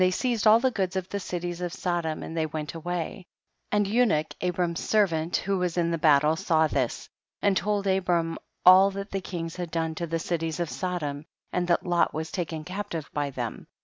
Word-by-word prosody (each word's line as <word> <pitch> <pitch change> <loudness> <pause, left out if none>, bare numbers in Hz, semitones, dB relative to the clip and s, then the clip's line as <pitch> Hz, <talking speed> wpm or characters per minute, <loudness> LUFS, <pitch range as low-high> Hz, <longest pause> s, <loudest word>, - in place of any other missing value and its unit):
45 185 0 +4
seized 235 -4 +1
all 220 +1 +8
the 260 +1 +2
goods 190 -4 -1
of 185 -1 -2
the 200 - -2
cilics 175 -1 -4
of 175 - -2
Sodom, 170 -3 -2
and 160 - -6
they 160 -1 0
went 150 -1 -5
away; 175 +2 -4 0.4
and 210 -1 +3
Unic, 205 -8 +2
Abram's 175 -1 0
servant, 170 -6 +1
who 195 0 -1
was 180 -1 -1
in 170 -1 +2
the 165 - 0
battle, 150 0 +5
saw 160 -1 +2
this, 135 -5 -1 0.3
and 200 -1 +2
told 205 0 0
Abram 180 -4 +1 0.3
all 185 +2 +9
that 200 +1 -6
the 195 - -2
kings 165 -3 -5
had 175 -2 -4
done 160 0 -1
to 170 +1 -4
the 165 +1 -1
cities 165 -1 -2
of 170 -3 -2
Sodom, 155 -6 -3 0.3
and 175 -1 0
that 175 - +2
Lot 175 -3 +2
was 160 +1 -3
taken 165 -4 -3
captive 180 -3 -5
by 145 -1 -1
them. 135 - -5
175 Hz, 205 wpm, -27 LUFS, 160-190 Hz, 0.4 s, all